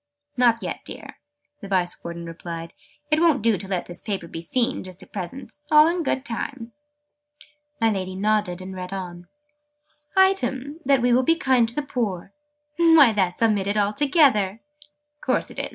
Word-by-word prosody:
"Not 240 Hz, -2 st, +3 dB
yet, -, -, -4 dB
dear," -, -, -9 dB, 0.4 s
the 200 Hz, -, -7 dB
Vice 185 Hz, -2 st, -1 dB
Warden 170 Hz, 0 st, -6 dB
replied. 165 Hz, 0 st, -7 dB, 0.4 s
"It 305 Hz, -, +4 dB
won't 320 Hz, -9 st, +3 dB
do 225 Hz, -2 st, +4 dB
to 195 Hz, +1 st, -7 dB
let 185 Hz, -2 st, -2 dB
this 175 Hz, -, -5 dB
paper 195 Hz, -5 st, -4 dB
be 165 Hz, -, -7 dB
seen, 235 Hz, +8 st, 0 dB
just 185 Hz, -1 st, -8 dB
at -, -, -20 dB
present. 245 Hz, +10 st, -7 dB
All 300 Hz, 0 st, +7 dB
in 340 Hz, +2 st, 0 dB
good 265 Hz, -3 st, -1 dB
time." 235 Hz, 0 st, -5 dB, 1.1 s
My 225 Hz, -1 st, +3 dB
Lady 185 Hz, -2 st, -3 dB
nodded, 205 Hz, -2 st, 0 dB
and 190 Hz, +1 st, -7 dB
read 180 Hz, +1 st, -6 dB
on. 175 Hz, -2 st, -7 dB, 0.9 s
"'Item, 290 Hz, -6 st, +2 dB
that 270 Hz, -2 st, +3 dB
we 245 Hz, 0 st, +3 dB
will 250 Hz, -, +5 dB
be 330 Hz, +6 st, +3 dB
kind 260 Hz, -8 st, +2 dB
to 235 Hz, -, -7 dB
the 295 Hz, -, -1 dB
poor.' 210 Hz, -9 st, -3 dB, 0.4 s
Why, 325 Hz, -7 st, +6 dB
that's 190 Hz, -1 st, 0 dB
omitted 205 Hz, -2 st, +1 dB
altogether!" 215 Hz, -, +2 dB, 0.6 s
"Course -, -, -1 dB
it -, -, -7 dB
is!" -, -, -2 dB
220 Hz, 170 wpm, -23 LUFS, 185-270 Hz, 1.1 s, All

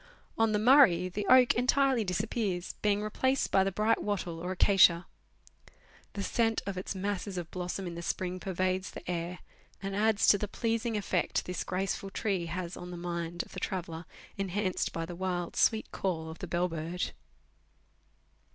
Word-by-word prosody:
On 225 Hz, -1 st, +2 dB
the 210 Hz, -, +2 dB
Murray, 210 Hz, -7 st, +6 dB
the 200 Hz, +2 st, -4 dB
oak 255 Hz, -1 st, +7 dB
entirely 260 Hz, 0 st, +3 dB
disappears, 195 Hz, -1 st, -2 dB
being 205 Hz, 0 st, +2 dB
replaced 260 Hz, +5 st, 0 dB
by 190 Hz, -, +5 dB
the 195 Hz, -, 0 dB
bright 215 Hz, +4 st, +1 dB
wattle 185 Hz, -5 st, -2 dB
or 180 Hz, +2 st, -4 dB
acacia. 185 Hz, -2 st, +5 dB, 1.1 s
The 200 Hz, -, -3 dB
scent 225 Hz, 0 st, +1 dB
of 200 Hz, -1 st, -3 dB
its 185 Hz, +2 st, -4 dB
masses 200 Hz, 0 st, -3 dB
of 170 Hz, -1 st, -5 dB
blossom 185 Hz, +1 st, -4 dB
in 175 Hz, -, -5 dB
the 170 Hz, -, -6 dB
spring 185 Hz, +1 st, -2 dB
pervades 185 Hz, 0 st, -1 dB
the -, -, -10 dB
air, 175 Hz, 0 st, -3 dB, 0.4 s
and 195 Hz, 0 st, -4 dB
adds 215 Hz, 0 st, +3 dB
to 205 Hz, -, +6 dB
the 210 Hz, -, -2 dB
pleasing 230 Hz, +1 st, -1 dB
effect 195 Hz, -3 st, 0 dB
this 180 Hz, -, -3 dB
graceful 195 Hz, +1 st, -2 dB
tree 195 Hz, -4 st, -1 dB
has 175 Hz, +1 st, -4 dB
on 180 Hz, -, -8 dB
the 175 Hz, -, -6 dB
mind 170 Hz, 0 st, -3 dB
of -, -, -18 dB
the -, -, -5 dB
traveller, 170 Hz, -3 st, -4 dB, 0.3 s
enhanced 195 Hz, 0 st, -1 dB
by 165 Hz, 0 st, -3 dB
the 175 Hz, -, -7 dB
wild, 180 Hz, -1 st, -3 dB
sweet 220 Hz, -1 st, +2 dB
call 160 Hz, -4 st, -2 dB
of 160 Hz, -, -11 dB
the -, -, -5 dB
bell 175 Hz, +1 st, +1 dB
bird. 165 Hz, +1 st, -3 dB
185 Hz, 175 wpm, -30 LUFS, 175-210 Hz, 1.1 s, oak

